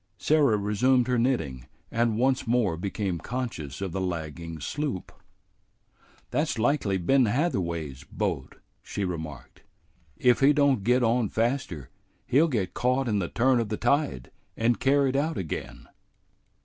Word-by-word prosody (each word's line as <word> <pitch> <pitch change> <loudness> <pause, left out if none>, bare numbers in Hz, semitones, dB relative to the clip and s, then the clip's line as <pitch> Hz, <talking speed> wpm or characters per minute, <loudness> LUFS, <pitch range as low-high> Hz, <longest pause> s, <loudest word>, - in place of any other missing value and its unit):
Sarah 145 -8 +3
resumed 120 +5 +2
her 125 -1 +1
knitting, 70 - -1 0.2
and 115 -2 +1
once 130 +1 +1
more 115 -7 +2
became 95 0 -3
conscious 95 - -5
of 95 -2 -3
the 95 - -3
lagging 85 -2 -4
sloop. 135 - -3 1.2
"That's 150 +1 0
likely 115 -5 +1
Ben 130 +9 +3
Hatherway's 85 - -1
boat," - - -3 0.3
she 100 - -4
remarked. 80 -5 -7 0.6
"If 125 -1 +4
he 140 +2 +5
don't 140 -7 +3
get 125 +3 +3
on 115 -2 +2
faster, 115 - -2 0.3
he'll 150 +6 +4
get 100 - -2
caught 130 +2 +1
in 105 -3 +1
the 90 - -1
turn 125 +1 +3
of 115 -3 -2
the 105 - -2
tide 120 - 0 0.3
and 115 +1 +2
carried 135 +1 +2
out 155 +3 0
again." 85 -5 -5
115 Hz, 140 wpm, -27 LUFS, 90-130 Hz, 1.2 s, he